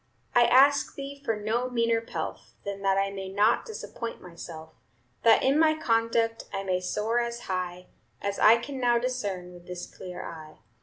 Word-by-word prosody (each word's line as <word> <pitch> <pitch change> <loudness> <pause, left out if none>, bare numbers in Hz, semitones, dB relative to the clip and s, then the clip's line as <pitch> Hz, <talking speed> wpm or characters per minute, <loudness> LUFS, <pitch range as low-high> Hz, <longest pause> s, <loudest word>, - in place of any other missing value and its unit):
I 240 0 +6
ask 280 +4 +5
Thee 280 0 -7
for 225 -5 0
no 225 +4 -1
meaner 230 -2 +1
pelf, 230 - -6
Than 200 0 -4
that 195 -1 +2
I 195 0 +1
may 195 -1 -6
not 205 +4 +2
disappoint 240 - -6
myself; 165 -2 -10 0.5
That 230 - +5
in 275 +3 +3
my 315 -1 +5
conduct 230 -4 +1
I 195 -1 -3
may 185 -2 0
soar 210 +6 0
as 235 0 -3
high 180 -2 -4 0.3
As 200 0 -3
I 225 +2 +7
can 265 +3 -6
now 240 -1 +3
discern 205 -8 -3
with 175 0 -14
this 180 -1 -6
clear 180 0 -8
eye. 155 -2 -9
225 Hz, 175 wpm, -28 LUFS, 185-240 Hz, 0.5 s, I